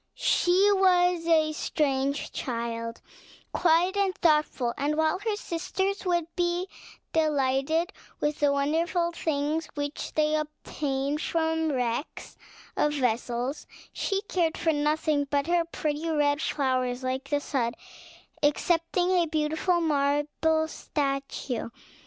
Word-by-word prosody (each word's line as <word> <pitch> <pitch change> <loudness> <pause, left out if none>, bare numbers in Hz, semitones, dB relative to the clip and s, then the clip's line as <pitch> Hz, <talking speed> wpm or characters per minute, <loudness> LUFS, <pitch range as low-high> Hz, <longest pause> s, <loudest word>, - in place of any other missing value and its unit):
She 375 +4 +3
was 360 -3 +3
a 315 -2 +4
strange 280 -2 -1
child, 230 -1 -4 0.5
quiet 350 +3 +3
and 395 -2 +1
thoughtful; 300 -7 +2
and 290 +2 0
while 315 +3 +2
her 425 +1 -1
sisters 380 +1 -2
would 345 -2 +2
be 350 +1 0 0.5
delighted 310 +3 +1 0.3
with 295 0 -1
the 290 -1 +3
wonderful 330 +5 +1
things 310 -1 -1
which 290 0 -4
they 305 0 +2
obtained 295 -1 -2
from 320 -1 0
the 295 - 0
wrecks 245 +3 -3 0.4
of 295 - +2
vessels, 245 +1 -1 0.3
she 395 0 -1
cared 345 -6 0
for 325 -1 +1
nothing 295 0 +1
but 280 -1 +1
her 345 0 +2
pretty 310 -1 -3
red 295 -1 +2
flowers, 255 -2 0
like 260 +1 -3
the 290 0 +2
sun, 250 -5 -1 0.7
excepting 335 +4 +2
a 350 -2 +3
beautiful 315 +3 +1
marble 300 +1 +1
statue. 275 -6 -3
305 Hz, 120 wpm, -27 LUFS, 280-335 Hz, 0.7 s, a